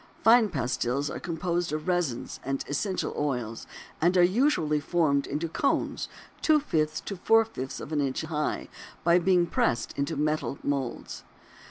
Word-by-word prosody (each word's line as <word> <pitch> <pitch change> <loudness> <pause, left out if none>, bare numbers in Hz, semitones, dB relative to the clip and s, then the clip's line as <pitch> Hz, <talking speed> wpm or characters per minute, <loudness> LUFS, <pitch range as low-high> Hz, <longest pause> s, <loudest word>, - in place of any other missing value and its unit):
Fine 225 -1 +6
pastils 130 -2 -1
are - - -5
composed 175 0 -2
of 155 +2 -3
resins 175 -9 -1
and 135 +1 -2
essential 185 +7 -2
oils 125 -6 -3 0.3
and 175 +3 +3
are 175 - +7
usually 185 - +2
formed 145 -3 +1
into 150 +4 -2
cones 275 - -1 0.3
two 310 -1 +5
fifths 155 - -1
to 200 - -5
four 225 +5 +4
fifths 135 - -6
of 150 - -8
an 150 -2 +1
inch 135 -2 -1
high, 155 -1 -2 0.4
by 170 +1 +5
being 180 0 +3
pressed 115 -8 0
in 140 - -1 0.2
metal 150 -2 -1
moulds. 135 -4 -3
155 Hz, 155 wpm, -27 LUFS, 140-180 Hz, 0.4 s, are